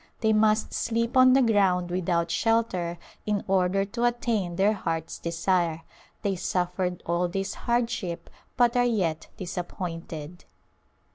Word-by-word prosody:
They 220 -1 +3
must 215 0 +2
sleep 230 +1 -1
on 255 0 +7
the 265 0 +5
ground 190 -6 +2
without 170 -2 0
shelter 205 -7 0 0.3
in 210 -2 0
order 190 +1 +2
to 235 +4 -4
attain 230 -7 0
their 200 +4 +3
heart's 165 -5 -3
desire. 170 -1 0 0.4
They 200 -1 0
suffered 180 0 -2
all 170 +1 +1
this 195 +2 -3
hardship 230 -7 -2 0.3
but 240 -1 +4
are 245 - +4
yet 190 -10 0
disappointed. 175 -3 -6
190 Hz, 130 wpm, -26 LUFS, 175-225 Hz, 0.4 s, on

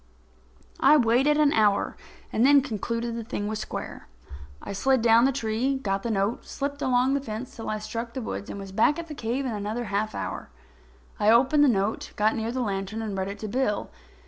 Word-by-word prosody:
I 305 - +6
waited 260 +4 +3
an 300 -1 +4
hour 210 -2 +2 0.4
and 225 - +2
then 280 0 +6
concluded 230 -1 -3
the 230 - -4
thing 210 -2 -4
was 215 0 -3
square. - - -6 0.5
I - - -7
slid 260 +4 +2
down 230 +1 +6
the 270 - +3
tree, 250 +1 -1
got 195 -7 -2
the 235 - -3
note, 205 +2 0
slipped 285 +1 -4
along 255 +1 +2
the 280 - 0
fence 230 0 -6
till 225 - -6
I 215 - -1
struck 230 +2 -5
the - - -2
woods, 205 - -5
and 200 - -6
was 195 -1 -8
back 220 - +3
at 335 -1 -6
the - - -5
cave 255 0 -2
in 255 - -2
another 215 +3 -3
half 210 0 -2
an - - -3
hour. - - -5 0.7
I 210 - +3
opened 265 +6 +5
the - - +6
note, 205 -3 0
got 215 +1 +2
near 225 0 -2
the 255 +1 -2
lantern 200 0 -3
and 210 -3 -4
read 190 0 -2
it 200 +1 -6
to 215 - -3
Bill. 210 -1 -1
230 Hz, 220 wpm, -26 LUFS, 210-265 Hz, 0.7 s, I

